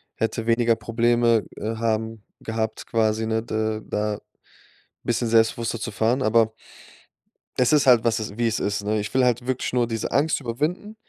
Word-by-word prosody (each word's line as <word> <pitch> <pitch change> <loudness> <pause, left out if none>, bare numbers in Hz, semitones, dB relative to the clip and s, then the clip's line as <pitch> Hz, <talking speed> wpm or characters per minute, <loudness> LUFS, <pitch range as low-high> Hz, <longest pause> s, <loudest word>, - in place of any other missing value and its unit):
hätte 115 0 -2
weniger 115 0 +3
Probleme, 115 -1 +2
äh, 110 +2 -3
haben 110 -1 -2 0.2
gehabt, 110 -1 -3
quasi, 110 -1 +1
ne, 110 0 0
de 110 -1 -2
da 105 0 -2 0.8
bisschen 120 0 0
selbstbewusster 115 +1 +2
zu 115 0 -4
fahren. 115 +5 +1
Aber 110 -1 +3 1.0
Es 125 - +3
ist 150 -2 +4
halt 125 -3 +6
was 115 -1 +2
es 105 -2 -5
wie 120 - +1
es 110 - -1
ist, 100 0 -2
ne? 105 +1 0
Ich 105 +2 -5
will 130 0 +3
halt 125 -1 +1
wirklich 130 -1 -2
nur 125 -1 +2
diese 115 -2 -3
Angst 155 +3 +2
überwinden, 150 - -3
115 Hz, 175 wpm, -24 LUFS, 110-120 Hz, 1.0 s, halt